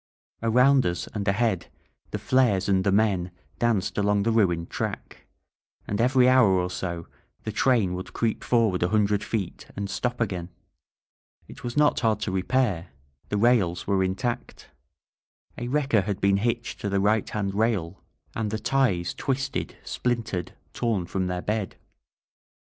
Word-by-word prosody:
Around 125 +4 +4
us 85 0 -2
and 105 -2 -3
ahead 100 -3 +1 0.4
the - - -3
flares 125 -8 +2
and 95 -2 +2
the 100 - +2
men 100 -3 +2 0.3
danced 115 -5 +1
along 100 0 +2
the 115 - +1
ruined 90 -7 +1
track; - - -5 0.6
and 105 +2 -1
every 125 +1 +4
hour 130 -4 +6
or 90 -1 0
so 85 -3 -4 0.4
the 110 - -3
train 105 -4 +2
would 90 +1 -6
creep 115 -2 -1
forward 115 -7 +2
a 90 - +2
hundred 105 -1 +2
feet 100 -6 -4
and 100 -1 -4
stop 125 -1 -2
again. 90 -6 -2 1.0
It - - -12
was 120 +2 -4
not 150 0 +4
hard 110 -3 +1
to - - -2
repair 95 -2 0 0.2
— 70 0 -38
the 105 - 0
rails 100 -6 +2
were 100 -1 +2
intact. 115 +6 -3 0.9
A 120 - -5
wrecker 135 -5 +2
had 100 0 -3
been 100 -1 +3
hitched 115 +3 -2
to 100 - -2
the 100 0 +1
right 105 +2 +2
hand 100 -2 -2
rail 100 -5 0 0.3
and 110 -2 -2
the 110 - -2
ties 110 -7 +1
twisted, 135 0 -3
splintered, 115 -7 -2 0.2
torn 110 -7 -1
from 95 +1 -2
their 90 0 -3
bed. 105 -2 -2
105 Hz, 160 wpm, -26 LUFS, 95-120 Hz, 1.0 s, hour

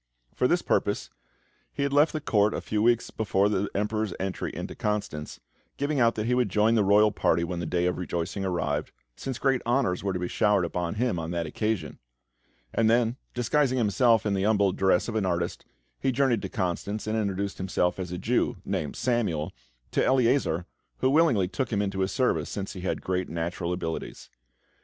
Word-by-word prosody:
For - - +2
this - - +1
purpose, - - 0 0.6
he 140 - -2
had 140 0 -1
left 145 +2 +5
the 155 - -2
Court 105 -7 +2
a - - -3
few 105 -1 -1
weeks 120 +1 +2
before 100 -2 +1
the 100 -1 0
Emperor's 105 -1 -1
entry 95 -1 -3
into - - -6
Constance, 105 -8 -3 0.4
giving 145 0 0
out 115 -1 +4
that 110 - -2
he 125 - +1
would 125 -4 +2
join 105 +4 +3
the 110 -3 +3
royal 105 +2 +5
party 85 -4 +1
when 85 0 -3
the 85 - -3
day 90 +1 0
of 90 0 0
rejoicing 90 +2 -3
arrived, 80 -5 -1 0.2
since 130 -3 -5
great 135 -2 +1
honours 120 -7 +1
were 100 - 0
to 95 - -2
be 90 0 -2
showered 105 -2 +2
upon 85 +2 -3
him 115 -5 0
on 80 0 -4
that 85 -1 -2
occasion; 100 -2 -2 0.7
and 110 -1 +3
then, 115 0 +3 0.2
disguising 130 +2 +1
himself 115 0 +3
in 105 - +1
the 95 - 0
humble 100 -1 +3
dress 95 -1 +2
of 115 - -3
an 110 -2 0
artist, 85 -1 -2 0.3
he 135 - +1
journeyed 125 -4 +2
to - - -4
Constance, 100 0 -2
and 110 +1 -1
introduced 100 -2 -2
himself 95 -1 0
as 90 -2 -4
a 90 - -3
Jew, 90 - 0
named 75 - -2
Samuel, 100 -10 0 0.4
to - - +2
Eleazar, 125 - +2 0.3
who 130 - +2
willingly 140 - +4
took 95 +8 -3
him 105 - +1
into 95 -1 -1
his 95 0 0
service, 130 -2 +1
since 100 -2 -4
he 95 - -7
had 95 - -2
great 90 0 -1
natural 85 +1 -3
abilities. 85 -2 -5
100 Hz, 200 wpm, -27 LUFS, 90-115 Hz, 0.7 s, left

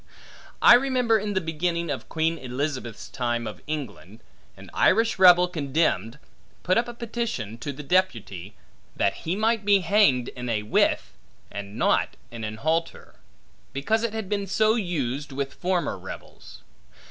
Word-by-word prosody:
I - - +10
remember, 245 -3 +3
in 205 0 -3
the - - +3
beginning 170 0 -2
of 135 - -5
Queen 165 0 0
Elizabeth's 130 -2 -4
time 120 -2 -2
of 110 - -7
England, 110 - -6 0.4
an - - -13
Irish 225 +1 +3
rebel 180 -1 +7
condemned, 140 - -1 0.5
put 185 - +2
up 235 +1 +2
a 240 - -6
petition 225 - -4
to 145 - -4
the 145 +2 -9
deputy, 115 - -1 0.4
that - - +1
he 170 +3 -3
might 220 +1 +1
be 200 -1 +4
hanged 170 - +3
in 125 -1 -6
a 105 -2 0
withe, 105 - +1 0.4
and 100 +1 -7
not - - +1
in 115 -1 -7
an 110 0 -4
halter; 160 +6 -2 0.6
because 215 +12 0
it 230 -2 -2
had 220 -3 -4
been 200 0 -2
so 215 +3 +3
used, 145 - -2
with 135 0 -3
former 180 -1 -1
rebels. - - -11
160 Hz, 155 wpm, -25 LUFS, 125-200 Hz, 0.6 s, I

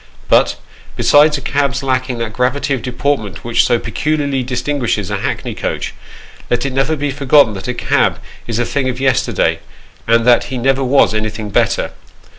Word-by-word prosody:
But, - - +4 0.4
besides 150 +1 +4
a - - -7
cab's 140 0 -1
lacking 130 -1 -1
that 115 -2 -4
gravity 130 +4 0
of 130 - -2
deport 140 +3 -1
ment 105 -4 -9
which 120 0 +2
so 120 - +2
peculiarly 140 +4 -1
distinguishes 125 -5 -2
a - - -1
hackney - - -3
coach, - - -4 0.6
let 120 - 0
it 135 - -2
never 135 +4 +1
be 145 -1 -2
forgotten 140 -3 +4
that 95 +2 -7
a 125 - -2
cab - - +1 0.3
is 115 -2 -2
a 120 - 0
thing 130 +1 -1
of 125 0 -4
yesterday, 130 -2 +1 0.5
and 115 0 +3
that 125 -1 +4
ho 130 - -5
never 135 +2 +1
was 135 -2 +3
anything 110 -1 -3
better. - - +1
130 Hz, 180 wpm, -16 LUFS, 120-140 Hz, 0.6 s, But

